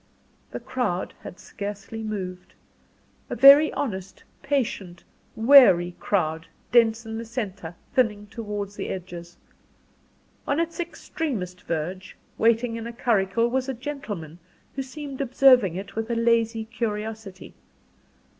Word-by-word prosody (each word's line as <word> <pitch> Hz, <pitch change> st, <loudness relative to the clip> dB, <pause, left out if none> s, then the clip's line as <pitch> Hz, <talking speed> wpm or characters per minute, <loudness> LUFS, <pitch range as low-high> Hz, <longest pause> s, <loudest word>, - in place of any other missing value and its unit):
The -, -, -6 dB
crowd 215 Hz, -8 st, -2 dB
had -, -, -10 dB
scarcely 205 Hz, +2 st, -7 dB
moved; 190 Hz, -4 st, -6 dB, 0.7 s
a -, -, -3 dB
very 280 Hz, +5 st, +8 dB
honest, 190 Hz, -8 st, -4 dB, 0.2 s
patient, 210 Hz, -10 st, -2 dB, 0.3 s
weary 220 Hz, -8 st, +6 dB
crowd 160 Hz, -4 st, -1 dB, 0.2 s
dense 230 Hz, -1 st, +4 dB
in 225 Hz, 0 st, -5 dB
the -, -, -5 dB
centre, 200 Hz, -8 st, -5 dB, 0.2 s
thinning 210 Hz, -5 st, +1 dB
towards 205 Hz, -2 st, -6 dB
the -, -, -5 dB
edges. 175 Hz, -2 st, -7 dB, 1.1 s
On 280 Hz, -, +1 dB
its 335 Hz, +1 st, -2 dB
extremest 230 Hz, -, -4 dB
verge, 175 Hz, +3 st, -4 dB, 0.2 s
waiting 230 Hz, +1 st, +2 dB
in 230 Hz, 0 st, -6 dB
a 235 Hz, -, -7 dB
curricle, 230 Hz, -1 st, +1 dB
was 260 Hz, +2 st, -1 dB
a 265 Hz, -, -2 dB
gentleman, 215 Hz, -, -6 dB, 0.4 s
who 270 Hz, -, -2 dB
seemed 275 Hz, +1 st, -7 dB
observing 255 Hz, -7 st, +5 dB
it 195 Hz, +2 st, -7 dB
with 225 Hz, +1 st, -3 dB
a 235 Hz, -, 0 dB
lazy 230 Hz, -1 st, +1 dB
curiosity. 220 Hz, -3 st, -5 dB
220 Hz, 125 wpm, -25 LUFS, 190-245 Hz, 1.1 s, very